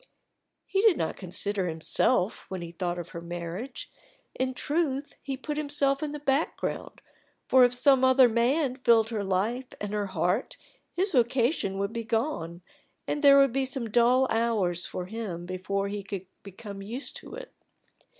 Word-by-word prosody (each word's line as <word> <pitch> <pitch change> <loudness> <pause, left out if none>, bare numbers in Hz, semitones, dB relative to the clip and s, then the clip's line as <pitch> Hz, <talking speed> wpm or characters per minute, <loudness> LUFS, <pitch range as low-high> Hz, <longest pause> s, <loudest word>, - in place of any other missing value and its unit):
He 390 - 0
did 430 -6 +5
not 160 - -2
consider 190 +1 -1
himself 180 +6 +1
when 185 -2 -5
he 170 - -7
thought 175 0 -3
of 175 -1 -6
her 170 - -7
marriage; 175 +8 -6 0.4
in 260 0 -2
truth 290 -1 -1
he 270 -2 -4
put 295 +3 -5
himself 285 -2 +1
in 305 -1 -3
the 295 - -5
background, 280 +2 -2 0.5
for 260 -1 +6
if 245 0 +3
some 265 0 +4
other 260 -1 +6
man 250 +4 +1
filled 230 -3 +4
her 215 -3 -2
life 210 +7 -1
and 205 0 -4
her 205 -1 -1
heart 185 +5 -1 0.3
his 380 +3 +1
vocation 240 - +1
would 200 +2 -2
be 230 - -3
gone, 220 - -2 0.4
and 295 - -2
there 280 -1 +8
would 275 -3 +5
be 270 0 +1
some 260 -4 -3
dull 245 +3 +4
hours 215 -7 +1
for 180 - -5
him 185 -4 -5
before 190 +2 -2
he 205 0 -4
could 195 -1 -6 0.2
become 200 0 -9
used 235 +8 -5
to - - -10
it. - - -10
230 Hz, 170 wpm, -27 LUFS, 190-270 Hz, 0.5 s, there